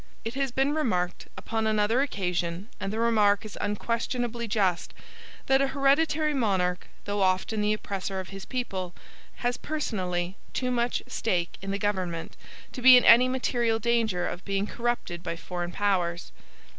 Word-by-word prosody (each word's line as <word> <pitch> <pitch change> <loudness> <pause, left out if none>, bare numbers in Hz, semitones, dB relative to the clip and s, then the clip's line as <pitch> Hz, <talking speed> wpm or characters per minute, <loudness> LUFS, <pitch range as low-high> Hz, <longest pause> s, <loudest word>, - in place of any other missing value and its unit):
It 225 - -3
has 275 -1 -1
been 270 +3 +1
remarked, 185 - -1
upon 220 -1 -2
another 215 +3 +2
occasion, 180 -5 -2
and 195 - -3
the 215 - -3
remark 215 -3 +3
is 210 - -8
unquestionably 235 +3 -2
just, 195 -5 0 0.5
that 270 0 +4
an 275 - +3
hereditary 290 +3 +2
monarch, 190 -8 0 0.2
though 205 0 -1
often 190 +3 +1
the 210 +1 +2
oppressor 195 -2 -4
of 185 - -7
his 195 0 -8
people, 190 -8 -4 0.5
has 245 0 +1
personally 185 - -3 0.2
too 255 -1 -1
much 240 0 0
stake 175 -6 -1
in 195 - -6
the 200 - -1
government 185 -5 -2 0.4
to 255 - -7
be 255 0 +10
in 245 - +3
any 240 +2 +8
material 240 -3 +1
danger 225 -5 +1
of 180 - -6
being 195 0 -1
corrupted 235 -7 -3
by 170 0 -4
foreign 175 +1 -5
powers. 175 -3 -1
210 Hz, 155 wpm, -27 LUFS, 185-245 Hz, 0.5 s, be